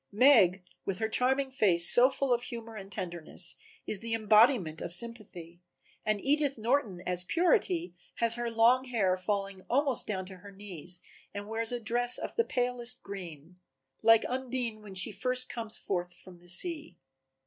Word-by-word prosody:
Meg, 205 -6 +5 0.2
with 195 -2 -3
her 220 - -1
charming 265 +4 +1
face 180 -9 +3
so 245 +2 +5
full 270 -1 0
of 240 - 0
humor 230 -2 -8
and 195 -2 -9
tenderness, 175 -4 -2 0.3
is 210 - 0
the 230 +1 -3
embodiment 215 - +3
of 170 - +2
Sympathy, 180 -6 -5 0.4
and 215 -1 0
Edith 285 -1 +1
Norton 220 -6 -1
as 180 0 -1
Purity 350 - +1 0.2
has 230 -1 +4
her 240 0 -1
long 235 +3 +3
fair 250 - -11 0.2
hair 185 - +2
falling 195 0 -3
almost 270 -1 +1
down 190 -3 -3
to 190 0 -9
her 200 +3 -13
knees 180 -3 -7 0.3
and 200 0 -6
wears 225 +1 -2
a 245 - -2
dress 240 +2 +3
of - - -5
the 460 - +2
palest 245 - -1
green 180 -3 -9 0.4
like 225 0 +5
Undine 250 -3 -3
when 200 -2 -11
she 185 +4 +2
first 255 +3 -1
comes 225 -2 0
forth 175 -2 -4
from 180 -2 -15
the 175 0 -14
sea. 305 - -3
220 Hz, 170 wpm, -30 LUFS, 185-250 Hz, 0.4 s, Meg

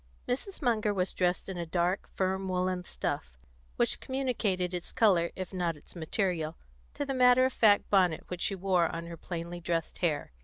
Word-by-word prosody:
Mrs. 315 +7 -3
Munger 215 -4 +2
was 185 0 0
dressed 180 -1 0
in 190 -2 -5
a 170 - -2
dark, 175 +3 0
firm 190 0 0
woollen 185 0 0
stuff, 60 - -4 0.4
which - - +2
communicated 220 -9 -1
its 175 -1 -5
colour, 180 -6 +4
if 185 0 -6
not 175 -4 -1
its 145 - -16
material, 170 -1 -1 0.4
to 285 - -2
the 275 - -2
matter 250 0 +6
of 260 - 0
fact 205 -3 +4
bonnet 180 -5 +3
which 180 0 -5
she 195 - +1
wore 185 -2 +2
on 165 +1 -5
her 170 0 -7
plainly 170 +1 -5
dressed 165 -1 -2
hair. 160 - 0
185 Hz, 185 wpm, -30 LUFS, 170-205 Hz, 0.4 s, matter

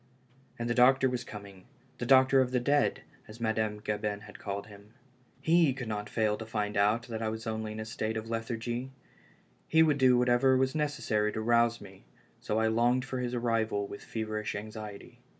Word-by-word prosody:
And 120 - -3
the 120 - +1
doctor 130 +2 +5
was 125 -1 -2
coming 100 -4 -11 0.2
— - - -33
the 120 - -3
doctor 130 +1 +6
of 130 - +1
the 125 0 +1
dead, 145 +4 +1 0.2
as 110 +2 -12
Madame 110 -2 -1
Gabin 105 -1 -3
had 105 0 -12
called 100 0 -4
him. 105 +2 -16 0.5
lie 165 -5 +4
could 125 -4 -5
not 105 -1 -4
fail 110 -2 0
to 110 - -7
find 105 -2 -2
out 105 +3 +2
that 115 -1 -6
I 110 - 0
was 110 +1 -6
only 110 -1 -3
in 110 - -7
a 110 - -4
state 110 0 -3
of 110 +1 -5
lethargy; 115 +2 -3 0.8
he 160 0 +5
would 150 -3 +2
do 130 -1 +5
whatever 125 +2 +4
was 130 0 +1
necessary 120 -9 0
to 110 - -3
rouse 115 0 +3
me, 95 -2 -13 0.4
so 105 - -2
I 110 - +2
longed 120 +3 +2
for 130 -1 -4
his 125 0 -2
arrival 115 -4 0
with 100 - -9
feverish 110 -1 -4
anxiety. 105 -1 -8
115 Hz, 200 wpm, -30 LUFS, 105-125 Hz, 0.8 s, doctor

